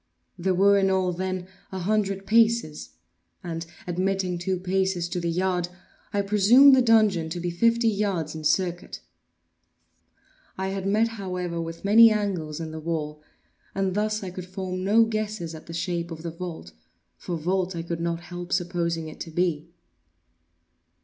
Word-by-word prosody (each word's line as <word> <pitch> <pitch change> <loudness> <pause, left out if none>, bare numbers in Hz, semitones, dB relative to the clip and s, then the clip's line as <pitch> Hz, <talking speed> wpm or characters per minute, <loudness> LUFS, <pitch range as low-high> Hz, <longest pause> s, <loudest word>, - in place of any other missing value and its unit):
There 185 0 0
were 200 +2 +5
in 195 0 +2
all, 185 -1 +1
then, 185 0 -3 0.2
a 190 - -5
hundred 195 0 -1
paces; 225 -8 +2 0.5
and, 165 -2 -4 0.2
admitting 185 0 -1
two 185 +2 -1
paces 190 -1 0
to 180 - -2
the 170 -1 -2
yard, 180 0 0 0.4
I 205 -1 0
presumed 220 +8 +7
the 260 - +4
dungeon 215 -8 +3
to 175 - -4
be 175 0 -2
fifty 230 +6 +2
yards 195 -7 0
in 160 -1 -7
circuit. 175 +3 -1 1.6
I 190 0 -2
had 195 0 -3
met, 215 +3 +3
however, 180 -6 -4
with 165 +3 -7
many 225 +3 +8
angles 185 -8 -2
in 160 -1 -5
the 160 - -6
wall, 155 -2 -4 0.5
and 195 -1 0
thus 215 +1 -1
I 185 - -5
could 185 0 -8
form 185 -1 -4
no 215 +4 +5
guess 215 -1 -2
at 160 - -11
the - - -8
shape 170 0 -2
of 165 -1 -8
the 170 - -4
vault, 165 - -7 0.4
for 175 - -5
vault 180 +3 -1
I 165 - -3
could 170 0 -4
not 170 0 -2
help 175 +1 -8
supposing 170 -3 -1
it 155 - -10
to - - -6
be. 165 -1 -1
185 Hz, 165 wpm, -25 LUFS, 170-200 Hz, 1.6 s, many